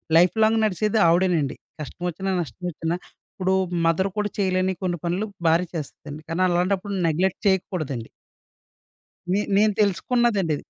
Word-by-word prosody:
Life 175 +4 +5
long 220 +1 +3
నడిసేది 215 +2 +1
ఆవిడేనండి. 170 -4 +2 0.3
కష్టమొచ్చినా, 180 +5 -4
నష్టమొచ్చినా. 165 +2 -4 0.4
ఇప్పుడు 190 0 0 0.3
mother 165 +4 +2
కూడా 210 0 0
చేయలేని 185 -1 +1
కొన్ని 175 -1 -1
పనులు, 180 +5 0 0.2
భార్య 165 +3 +3
చేస్తుందండి. 150 -1 -7
కానీ, 165 +3 -1
అలాంటప్పుడు 185 +3 0
నెగ్లెక్ట్ 175 +4 0
చేయకూడదండి. 155 - -1 1.2
నే 200 - +2 0.2
నేను 210 +1 +4
తెలుసుకున్నదండిది. 205 - +2
180 Hz, 120 wpm, -24 LUFS, 165-200 Hz, 1.2 s, Life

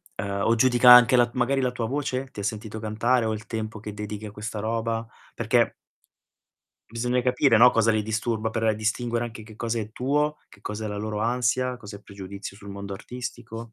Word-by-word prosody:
Uhm, 100 0 -3
o 115 - +4
giudica 125 +1 +6
anche 125 +1 +9
la 120 -1 +4
magari 130 +2 +1
la 125 -1 +1
tua 120 -2 -3
voce? 135 -1 -2
Ti 105 - -9
ha - - -4
sentito 110 +1 -4
cantare 115 +3 +1
o 110 - 0
il 110 0 -7
tempo 110 -1 -5
che 105 -1 -7
dedichi 105 0 -6
a 105 - -7
questa 105 0 -6
roba? 115 +1 -2 0.3
Perché - - +2 1.2
bisogna 125 +2 0
capire, 125 0 +3
no, 125 +3 +8
cosa 115 0 +3
li 110 - +2
disturba 110 +1 -1
per 110 -1 +1
distinguere 115 +2 -1
anche 115 -1 -8
che 110 0 -13
cosa 115 0 -2
è 110 0 -6
tuo, 145 +5 0
che 100 - -19
cosa 105 0 -5
è - - -2
la 105 - -4
loro 105 0 -3
ansia, 125 +2 0
cos'è 105 -3 -10
pregiudizio 100 0 -9
sul 100 -1 -12
mondo 100 0 -7
artistico. 115 +1 -7
115 Hz, 200 wpm, -25 LUFS, 105-125 Hz, 1.2 s, anche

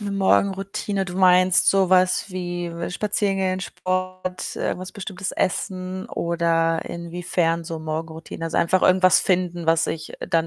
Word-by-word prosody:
'Ne 205 -1 -4
Morgenroutine. 195 0 0
Du 180 -1 -7
meinst 185 0 +5
so 195 -2 +3
was 185 +1 +3
wie 175 -2 -4 0.2
spazieren 205 0 -1
gehen, 185 -1 0
Sport, 185 0 -4
irgendwas 185 0 -3
bestimmtes 195 -1 -5
essen, 185 0 -2
oder 165 -1 0
inwiefern 170 -1 -2
so 165 -1 -5
Morgenroutine? 160 +1 -5
Also, 165 - -1
einfach 185 +2 +2
irgendwas 185 0 +5
finden, 175 -2 0
was 165 0 +3
ich 160 - -5
dann 165 0 0
185 Hz, 140 wpm, -23 LUFS, 170-185 Hz, 0.2 s, meinst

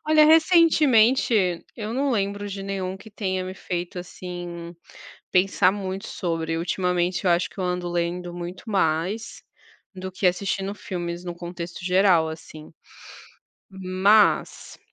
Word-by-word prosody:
Olha 310 0 +6
recentemente, 270 - +4
eu 215 0 -4
não 275 +2 0
lembro 205 -2 -1
de 195 0 -6
nenhum 190 -1 -3
que 220 +3 -14
tenha 190 -3 -2
me 185 - -5
feito 180 -1 -5
assim, 175 -1 -7 0.6
pensar 185 0 +3
muito 195 0 -5
sobre, 165 -2 -2
ultimamente 180 +1 -1
eu 180 - +4
acho 170 +1 +1
que - - -21
eu - - -1
ando 180 -1 -2
lendo 175 +1 -2
muito 175 +5 -7
mais, 190 +3 -1 0.5
do 185 0 -6
que 185 +1 +1
assistindo 195 +2 -1
filmes 175 -3 -5
num 175 -1 -5
contexto 175 0 -7
geral 180 -3 +4
assim. 155 -1 -10 1.0
Mas 190 +2 +2
185 Hz, 135 wpm, -24 LUFS, 175-200 Hz, 1.0 s, Olha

